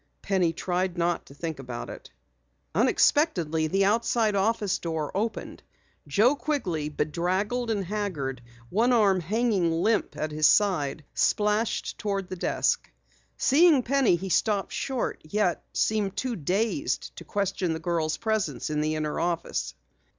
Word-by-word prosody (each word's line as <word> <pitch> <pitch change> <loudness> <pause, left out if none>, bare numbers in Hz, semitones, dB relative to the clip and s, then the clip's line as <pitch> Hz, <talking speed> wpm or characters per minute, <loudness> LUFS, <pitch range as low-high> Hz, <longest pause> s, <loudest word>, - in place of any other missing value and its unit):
Penny 185 -4 +2
tried 180 +1 -2
not 175 0 0
to 140 - -14
think 160 -1 -5
about 125 -3 -6
it. - - -10 0.6
Unexpectedly, 180 - +2
the 195 +4 +2
outside 225 +1 +2
office 205 0 +1
door 160 -3 -3
opened. 215 +2 -3 0.5
Joe 215 - +4
Quigley, 185 - -2
bedraggled 185 +11 -1
and 205 -4 -1
haggard, 170 - -3 0.3
one 235 +6 +3
arm 200 -5 +4
hanging 200 -1 +1
limp 210 +7 0
at 155 - -2
his 155 0 +4
side, 160 -8 +2
splashed 210 +2 0
toward 195 -3 -2
the 185 - -4
desk. 175 - 0 0.5
Seeing 295 -1 +5
Penny, 270 -6 +3
he 190 +3 -5
stopped 200 +1 +1
short, 265 -3 -2
yet 180 +2 0
seemed 205 -3 0
too 250 +1 -1
dazed 215 - -1
to - - -8
question 195 -4 -1
the 160 - -4
girl's 160 -2 -1
presence 220 -6 -1
in 150 0 0
the 155 +1 0
inner 155 -1 -2
office. 165 - -2
190 Hz, 140 wpm, -27 LUFS, 160-220 Hz, 0.6 s, Seeing